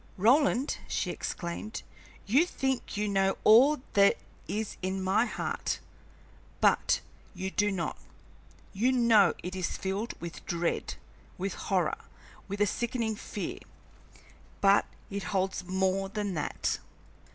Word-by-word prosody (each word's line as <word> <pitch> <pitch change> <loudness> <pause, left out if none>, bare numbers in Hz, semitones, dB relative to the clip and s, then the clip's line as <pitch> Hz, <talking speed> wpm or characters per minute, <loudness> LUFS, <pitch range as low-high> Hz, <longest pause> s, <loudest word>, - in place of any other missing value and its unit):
"Roland," 260 +5 +3
she - - -1
exclaimed, 175 +5 -5 0.4
"you 260 +10 +5
think 265 - -2
you 210 0 0
know 195 -1 +2
all 260 +7 +7
that 200 0 +5 0.3
is 215 0 -3
in 190 +1 -1
my 190 +5 +2
heart, - - -2 0.8
but - - +3 0.3
you 190 +1 -3
do 205 +1 +2
not. 180 -3 -3 0.7
You 230 +6 +2
know 235 -5 +5
it 185 +1 -4
is 185 -2 -2
filled 195 +4 -3
with 170 -1 -7
dread, 170 0 -1 0.4
with - - -2
horror, - - 0 0.5
with 200 +1 -4
a - - +6
sickening 230 +1 -1
fear, 210 - -5 1.0
but 200 0 +5 0.2
it 200 0 -3
holds 185 0 -1
more 190 +1 0
than 205 -1 -2
that. 155 - -1
200 Hz, 125 wpm, -30 LUFS, 190-230 Hz, 1.0 s, all